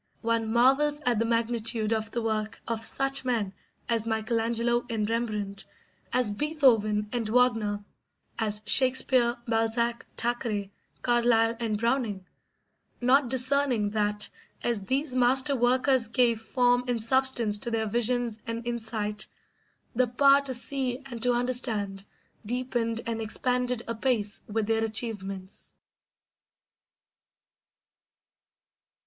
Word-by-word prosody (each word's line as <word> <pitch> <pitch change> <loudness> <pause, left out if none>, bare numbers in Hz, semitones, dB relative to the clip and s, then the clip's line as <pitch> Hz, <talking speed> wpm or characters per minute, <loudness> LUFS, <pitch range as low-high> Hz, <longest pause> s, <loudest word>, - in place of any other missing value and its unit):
One 230 -1 -1
marvels 270 +5 +3
at 240 -3 +2
the 230 - +1
magnitude 230 -1 0
of 220 0 -2
the 235 0 -3
work 215 -1 -2
of 225 -1 -3
such 270 +3 +1
men 225 -7 -1 0.3
as 230 -1 0
Michelangelo 230 +2 0
and 215 -2 -1
Rembrandt, 215 -3 -3 0.5
as 250 -4 +1
Beethoven 225 -6 +2
and 230 -3 -2
Wagner, 220 -4 +1 0.6
as 210 -1 -1
Shakespeare, 255 -1 +4
Balzac, 230 +1 -1
Thackeray, 225 -4 -2 0.3
Carlyle, 235 -1 +3
and 220 -3 -1
Browning; 230 -4 -1 0.7
not 255 +1 +3
discerning 255 -4 +2
that, 210 -1 0 0.4
as 235 -4 0
these 265 +7 -1
master 260 +3 +4
workers 255 0 +2
gave 235 -1 +2
form 245 +1 +1
and 245 -2 -1
substance 235 -3 +3
to 235 - -2
their 225 -1 -1
visions 235 +1 0
and 230 0 -4
insight, 220 -3 -2 0.7
the 250 +1 +2
power 275 +3 +4
to 265 -2 -1
see 255 0 -1
and 235 -1 -7
to 245 +1 +2
understand 235 -6 -1 0.4
deepened 235 0 -2
and 230 -1 -3
expanded 250 +2 -1
apace 225 -3 -1
with 215 0 -1
their 225 +1 0
achievements. 200 -4 -4
235 Hz, 115 wpm, -27 LUFS, 220-250 Hz, 0.7 s, Shakespeare